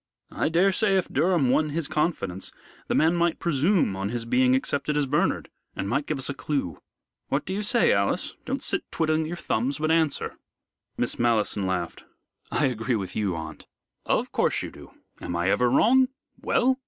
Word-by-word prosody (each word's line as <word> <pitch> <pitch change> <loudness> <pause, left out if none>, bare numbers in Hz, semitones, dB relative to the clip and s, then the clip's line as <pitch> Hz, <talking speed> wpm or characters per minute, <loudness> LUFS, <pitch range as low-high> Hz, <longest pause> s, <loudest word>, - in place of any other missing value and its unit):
I - - 0
daresay 195 +4 +3
if 185 - -1
Durham 170 -6 +2
won 155 +4 +2
his 155 0 -2
confidence, 100 - -2 0.4
the - - 0
man 160 +2 +3
might 170 -1 +1
presume 170 - +1
on 95 +1 -3
his 115 0 -3
being 125 +2 +3
accepted 145 +2 0
as 145 - +2
Bernard, 145 +3 0 0.2
and 95 - -3
might 140 +7 -1
give 155 - -1
us 135 - -2
a 140 - -2
clue. 135 - -3 0.5
What 140 - -1
do 190 - -3
you 200 - -2
say, 235 +3 +3
Alice? 100 0 0
Don't - - -3
sit - - 0
twiddling 155 -1 0
your 175 +2 -5
thumbs, 130 -1 -1
but 155 +1 0
answer." 160 -3 0 0.6
Miss - - -1
Malleson 110 -4 +1
laughed. 90 -2 -3 0.5
"I 150 - +2
agree 120 -1 0
with 95 -4 -4
you, 100 -5 0
aunt." 80 -2 -8 0.4
"Of - - 0
course - - +1
you - - -6
do. - - -13 0.3
Am 85 - -4
I 85 +2 +1
ever 125 0 +3
wrong? 255 - +5 0.3
Well?" 260 +1 +2
140 Hz, 185 wpm, -26 LUFS, 110-165 Hz, 0.6 s, wrong